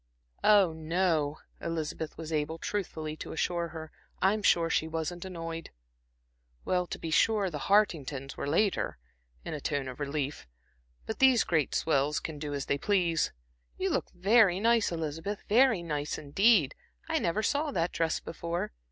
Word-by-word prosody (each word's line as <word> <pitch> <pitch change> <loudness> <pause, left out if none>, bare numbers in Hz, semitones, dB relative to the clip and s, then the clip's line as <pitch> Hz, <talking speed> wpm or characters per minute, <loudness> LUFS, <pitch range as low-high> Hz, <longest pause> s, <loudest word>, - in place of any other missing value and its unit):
"Oh, 200 -6 +5
no," 160 -2 0 0.2
Elizabeth 160 -1 -4
was 160 0 -6
able 155 +1 -1
truthfully 160 -5 -4
to - - -7
assure 170 +1 -1
her. 160 -1 -8 0.3
"I'm 200 +3 +2
sure 170 -4 +4
she 160 -1 +1
wasn't 165 +2 -4
annoyed." 165 -3 -6 1.0
"Well, 180 -1 +1
to - - -5
be 165 - -5
sure, 205 +1 +3
the 150 - -4
Hartingtons 150 -10 +1
were - - -4
later" 190 +7 +1 0.5
in - - -4
a 150 - -5
tone 140 -2 -1
of 130 +1 -7
relief 145 - -3 0.6
"but 220 - -5
these 260 -3 +6
great 160 -5 0
swells 150 -1 +1
can 155 -2 -6
do 145 0 -4
as 140 - -3
they 140 - 0
please. 175 -5 +1 0.5
You - - 0
look - - -1
very 195 0 +4
nice, 230 -1 +3
Elizabeth, 165 +5 -4
very 230 -4 +4
nice 150 -3 -3
indeed. 165 - +3 0.3
I - - +1
never 190 +6 0
saw 290 +7 +1
that 175 -10 0
dress 165 -1 0
before. 170 +1 -4
165 Hz, 160 wpm, -30 LUFS, 155-195 Hz, 1.0 s, these